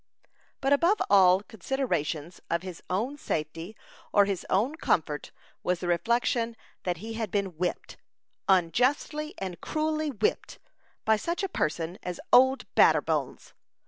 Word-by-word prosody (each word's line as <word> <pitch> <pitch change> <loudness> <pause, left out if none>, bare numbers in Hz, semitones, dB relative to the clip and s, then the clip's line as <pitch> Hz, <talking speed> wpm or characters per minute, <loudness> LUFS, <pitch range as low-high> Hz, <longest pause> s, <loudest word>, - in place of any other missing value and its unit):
But 270 +1 +3
above 345 +9 +3
all 190 -1 +6
considerations 180 - -3
of 170 +1 0
his 185 -3 -8
own 230 +10 -1
safety 165 - -4 0.4
or 205 -1 +5
his 195 -3 -3
own 220 +10 +2
comfort 155 - -1 0.3
was 180 -1 0
the 180 - -4
reflection 230 +5 +1 0.3
that 175 -2 0
he 220 +6 -7
had 225 -2 -3
been 195 -3 -1
whipped 175 +2 -3 0.5
unjustly 255 - +1
and 185 -3 -6
cruelly 310 0 -1
whipped 215 -6 -1 0.5
by 220 0 +4
such 340 - -3
a - - +1
person 170 - -2
as 180 -1 -5
"Old 260 +2 +6
Batterbones." - - +2
205 Hz, 135 wpm, -28 LUFS, 175-265 Hz, 0.5 s, all